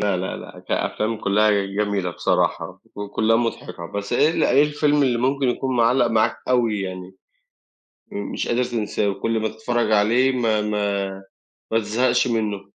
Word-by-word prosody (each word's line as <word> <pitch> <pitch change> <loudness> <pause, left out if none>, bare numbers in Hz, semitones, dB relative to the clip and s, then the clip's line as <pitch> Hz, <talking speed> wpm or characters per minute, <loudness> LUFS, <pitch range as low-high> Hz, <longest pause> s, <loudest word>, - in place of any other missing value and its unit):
لأ، 100 -2 +1
لا، 90 +1 -3
لا، - - -11
كأفلام 110 +1 -1
كلّها 105 +1 +2 0.2
جميلة 100 -2 -1
بصراحة - - -1 0.2
وكلّها 110 +2 +1
مُضحكة. 90 -7 -3
بس 100 +5 -5
إيه 150 +6 +4
ال - - +1
إيه 140 - +5
الفيلم 150 -1 +2
اللي 125 -3 +1
ممكن 135 +1 +1
يكون 130 +1 -1
معلق 120 +1 +3
معاك 110 -2 +1
أوي 115 -5 +2
يعني، 95 0 -6 1.0
م 205 0 -5
مش - - -3
قادر 120 +2 +1
تنساه، 110 -4 -1
وكُل 110 +3 -1
ما 110 - 0
تتفرج 110 +1 -1
عليه 115 +5 +3
ما 115 -4 +1
ما 105 -1 -1 0.7
ما 115 - +4
تزهقش 115 +5 +1
منه؟ 105 -4 -1
110 Hz, 160 wpm, -22 LUFS, 105-125 Hz, 1.0 s, إيه